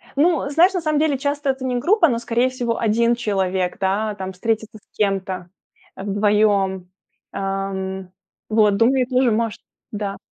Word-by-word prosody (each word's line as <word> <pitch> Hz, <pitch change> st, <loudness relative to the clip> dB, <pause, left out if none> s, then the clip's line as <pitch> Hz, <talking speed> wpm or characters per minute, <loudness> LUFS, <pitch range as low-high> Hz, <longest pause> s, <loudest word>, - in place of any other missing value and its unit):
Ну, 295 Hz, -1 st, +2 dB
знаешь, 345 Hz, +6 st, +4 dB
на 365 Hz, -, -1 dB
самом 310 Hz, -2 st, +1 dB
деле 300 Hz, -3 st, +2 dB
часто 285 Hz, +1 st, -2 dB
это 265 Hz, 0 st, -2 dB
не 250 Hz, -1 st, -1 dB
группа, 350 Hz, -, +4 dB
но, 235 Hz, -5 st, 0 dB
скорее 240 Hz, +2 st, +1 dB
всего, 240 Hz, -2 st, -2 dB
1 230 Hz, +2 st, +2 dB
человек, 190 Hz, -5 st, -1 dB
да, 205 Hz, +2 st, 0 dB
там 190 Hz, -1 st, -6 dB
встретиться 220 Hz, +3 st, -2 dB
с 210 Hz, -, -26 dB
кем-то 190 Hz, -3 st, -1 dB, 0.5 s
вдвоем. 200 Hz, -2 st, +1 dB, 0.4 s
Эм, 190 Hz, -1 st, -4 dB, 0.4 s
вот 210 Hz, -2 st, +3 dB
думаю 250 Hz, +3 st, +3 dB
тоже, 255 Hz, -1 st, +2 dB
может 225 Hz, 0 st, -1 dB, 0.3 s
да. 205 Hz, -2 st, -4 dB
220 Hz, 150 wpm, -21 LUFS, 195-260 Hz, 0.5 s, знаешь